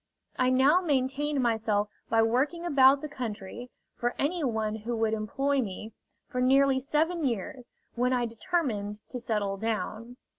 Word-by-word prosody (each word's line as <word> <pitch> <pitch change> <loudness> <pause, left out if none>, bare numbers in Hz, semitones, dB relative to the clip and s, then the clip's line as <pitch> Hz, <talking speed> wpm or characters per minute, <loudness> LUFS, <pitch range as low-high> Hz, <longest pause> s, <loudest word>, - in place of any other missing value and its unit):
I 255 0 +3
now 270 +7 +4
maintained 280 -2 0
myself 220 -3 +1 0.2
by 225 0 +4
working 280 +9 0
about 275 -3 +5
the 305 - -4
country, 240 -4 -6 0.2
for 240 0 -2
any 330 +3 -1
one 220 -4 -1
who 230 +2 -4
would 225 -1 +1
employ 270 +6 0
me, 215 0 -6 0.3
for 250 -3 -3
nearly 270 +1 +4
seven 315 +5 0
years, 240 0 -3 0.2
when 250 +1 +1
I 245 -1 +1
determined 230 - -2
to 250 - -5
settle 210 -4 -1
down. 225 +2 -4
250 Hz, 150 wpm, -28 LUFS, 220-275 Hz, 0.3 s, about